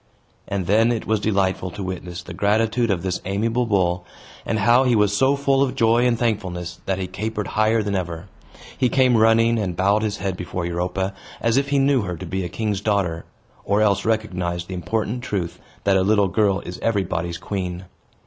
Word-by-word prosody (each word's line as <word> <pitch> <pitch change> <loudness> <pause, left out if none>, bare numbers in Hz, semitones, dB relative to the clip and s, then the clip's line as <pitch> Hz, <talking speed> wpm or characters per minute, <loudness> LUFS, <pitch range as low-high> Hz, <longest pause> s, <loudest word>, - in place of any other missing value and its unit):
And 100 -2 -2
then 110 +5 +3
it 115 - -2
was 110 -1 +1
delightful 95 -3 0
to 100 +3 -7
witness 90 -1 -6
the - - -9
gratitude 110 +3 +1
of 95 -4 0
this 95 -1 -2
amiable 115 +5 0
bull, 90 -4 +1 0.4
and 110 - 0
how 120 +5 +4
he 125 -2 +3
was 105 -1 +3
so 135 +5 +3
full 140 -1 +2
of 135 -2 +1
joy 115 0 +3
and 120 -1 +1
thankfulness 95 -7 -2
that 95 - 0
he 95 - -2
capered 105 +3 -4
higher 110 +1 +2
than 100 -1 -2
ever. 85 -2 -3 0.5
He 125 - +1
came 130 -2 +3
running, 115 +1 +4
and 90 -5 -3
bowed 100 +3 +3
his 110 -2 -2
head 95 -1 -2
before 90 0 -4
Europa, 90 +3 -2 0.3
as 115 0 +1
if 140 +1 +1
he 140 - +2
knew 135 -1 +3
her 90 -4 -4
to - - -7
be 95 0 -3
a 90 - -4
king's 105 +1 -2
daughter, 95 -6 0 0.4
or 100 +1 +1
else 100 -2 +2
recognized 90 -6 -1
the - - -4
important 110 +6 -2
truth 95 -8 -3 0.2
that 100 -1 +3
a - - +3
little 100 0 +3
girl 100 0 +2
is 90 - -8
everybody's 85 -6 -1
queen. 90 -2 -4
100 Hz, 200 wpm, -22 LUFS, 90-115 Hz, 0.5 s, how